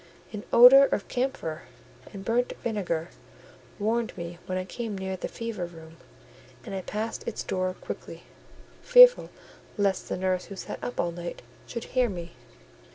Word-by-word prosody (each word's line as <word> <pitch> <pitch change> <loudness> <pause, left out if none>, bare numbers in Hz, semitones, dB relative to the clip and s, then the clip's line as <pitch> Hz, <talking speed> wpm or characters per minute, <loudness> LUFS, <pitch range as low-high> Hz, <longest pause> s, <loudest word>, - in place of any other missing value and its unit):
An 210 -1 -6
odour 250 +4 +9
of 205 - -2
camphor 245 - -3 0.5
and 195 -1 -9
burnt 240 +2 +1
vinegar 175 -7 -2 0.7
warned 225 +1 -1
me 170 0 -7
when 185 - -2
I 185 - -3
came 215 +1 -5
near 190 0 -3
the 185 - -5
fever 225 -6 -5
room: 165 -1 -14 0.7
and - - -7
I 190 - -3
passed 215 +4 -4
its 230 - -3
door 185 0 -2
quickly, - - -8 0.6
fearful - - +7 0.5
lest 200 -2 0
the - - -2
nurse 185 0 -1
who 200 - -9
sat - - -7
up 245 - -5
all 175 - +1
night 170 0 -7 0.2
should 235 -1 -5
hear 250 -2 +1
me. 175 -3 -7
195 Hz, 160 wpm, -27 LUFS, 180-235 Hz, 0.7 s, odour